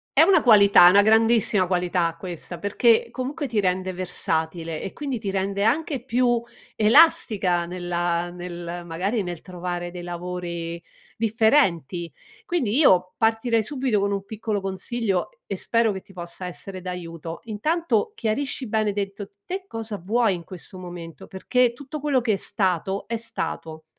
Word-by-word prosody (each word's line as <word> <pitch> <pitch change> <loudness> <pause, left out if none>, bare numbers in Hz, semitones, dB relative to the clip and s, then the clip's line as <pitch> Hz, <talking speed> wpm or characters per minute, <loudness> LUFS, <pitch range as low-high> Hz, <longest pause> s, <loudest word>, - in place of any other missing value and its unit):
è - - +7
una 370 -5 +5
qualità, 200 -7 +7
è - - +10
una 200 +2 +7
grandissima 220 -2 +4
qualità 175 -2 0
questa 175 0 -6
perchè 225 +3 +3
comunque 280 +4 -4
ti 225 - 0
rende 185 -1 0
versatile 165 -2 -1
e 195 - -6
quindi 275 -5 -4
ti 210 -3 -4
rende 195 +1 -1
anche 280 +1 0
più 240 -1 +2 0.4
elastica 210 - +4
nella 175 -1 -2
nel 175 0 -6
magari 190 +6 -1
nel 175 -2 -6
trovare 175 -1 -5
dei 175 0 -8
lavori 175 -1 -5 0.4
differenti, 210 - +2 0.3
quindi 270 - 0
io 185 - +4
partirei 225 0 +2
subito 255 -4 0
con 200 0 0
un 200 -1 -3
piccolo 215 0 -3
consiglio 195 - -2
e - - -31
e - - -3
spero 230 -1 +1
che 190 -1 -5
ti 195 - -19
possa 175 +1 -6
essere 185 +1 -7
d'aiuto, 170 -2 -7
intanto 330 - 0
chiarisci 255 - -2
bene 215 -1 0
dentro 200 0 -4 0.2
te 380 +1 -5
cosa 220 - -5
vuoi 225 +1 +2
in 170 - -8
questo 185 +2 -10
momento, 175 -4 -9
perché 240 +5 +1
tutto 285 +4 -8
quello 285 -2 +1
che 230 -2 +1
è 195 - 0
stato, 190 0 -1
è 230 - -2
stato, 165 -8 -5
195 Hz, 155 wpm, -24 LUFS, 175-230 Hz, 0.4 s, è